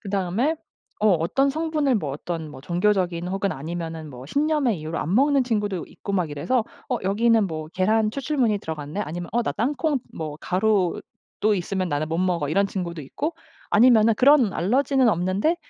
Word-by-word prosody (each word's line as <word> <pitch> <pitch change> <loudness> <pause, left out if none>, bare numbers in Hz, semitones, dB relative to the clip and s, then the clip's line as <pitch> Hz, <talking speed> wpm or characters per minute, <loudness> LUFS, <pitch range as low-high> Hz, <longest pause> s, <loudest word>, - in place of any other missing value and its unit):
그다음에 200 - 0 0.4
어 215 - +4
어떤 195 - +2
성분을 305 -4 0
뭐 155 -8 -2
어떤 160 +1 -5
뭐 130 -2 -11
종교적인 180 -1 0
혹은 195 +1 -1
아니면은 160 +1 -5
뭐 125 -2 -10
신념의 280 - +1
이유로 160 +2 -4
안 175 +6 -1
먹는 275 +1 +4
친구도 205 -6 -1
있고 200 - -7
막 175 -5 0
이래서 220 - 0 0.2
"어 250 - +1
여기는 220 +2 +3
뭐 155 -2 -5
계란 215 +3 +2
추출물이 265 -4 0
들어갔네.'" 155 +1 -5
아니면 175 +3 -5
"어 240 +2 +2
나 - - -2
땅콩 280 +5 0 0.2
뭐 155 -2 -5
가루도 205 +1 0
있으면 185 0 -2
나는 145 +1 -1
못 165 - -1
먹어." 175 -5 0
이런 195 +6 +2
친구도 175 -4 -4
있고 300 - -4 0.4
아니면은 230 0 +6
그런 255 -3 +5
알러지는 260 - +2
없는데 190 - +1
195 Hz, 370 characters per minute, -24 LUFS, 170-245 Hz, 0.4 s, 아니면은